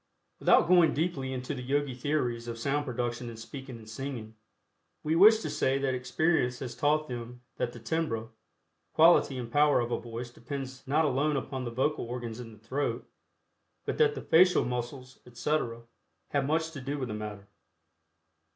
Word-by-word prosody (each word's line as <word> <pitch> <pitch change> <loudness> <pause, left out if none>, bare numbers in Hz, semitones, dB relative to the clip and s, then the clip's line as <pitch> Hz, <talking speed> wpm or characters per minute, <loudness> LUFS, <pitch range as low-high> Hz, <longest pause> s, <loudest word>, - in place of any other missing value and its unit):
Without - - +5
going 175 -2 +5
deeply 145 -4 -1
into 130 +2 -4
the 130 - -5
Yogi 140 +1 0
theories 125 -3 -1
of 115 -1 -4
sound 140 +5 -1
production 120 -1 -3
in 115 - -9
speaking 130 +2 -8
and 110 -1 -14
singing, 115 -1 -6 0.7
we 155 +1 +1
wish 215 +5 +7
to - - -3
say 135 +1 +1
that 135 -1 0
experience 125 +1 +1
has 125 -2 -5
taught 150 +5 +1
them 120 0 -7 0.2
that 120 - -1
the 120 - -10
timbre, 115 -3 -2 0.6
quality 160 -4 +5
and 120 -2 -5
power 145 0 +4
of 120 0 -2
a - - 0
voice 120 +1 -7
depends 135 0 -7
not 155 +4 +3
alone 145 +2 +1
upon 130 -1 -4
the - - -2
vocal 130 +3 0
organs 120 -1 -5
in 115 -2 -8
the 110 - -14
throat, 130 +7 -3 0.8
but - - -3
that 445 -1 +4
the - - -5
facial 180 +2 +5
muscles, 125 +1 -5
etc., 120 -2 -2 0.5
have 140 -1 0
much 160 +2 0
to 140 -4 -8
do 140 +3 -3
with 130 -3 -3
the - - -3
matter. 105 -2 -6
130 Hz, 180 wpm, -29 LUFS, 120-145 Hz, 0.8 s, wish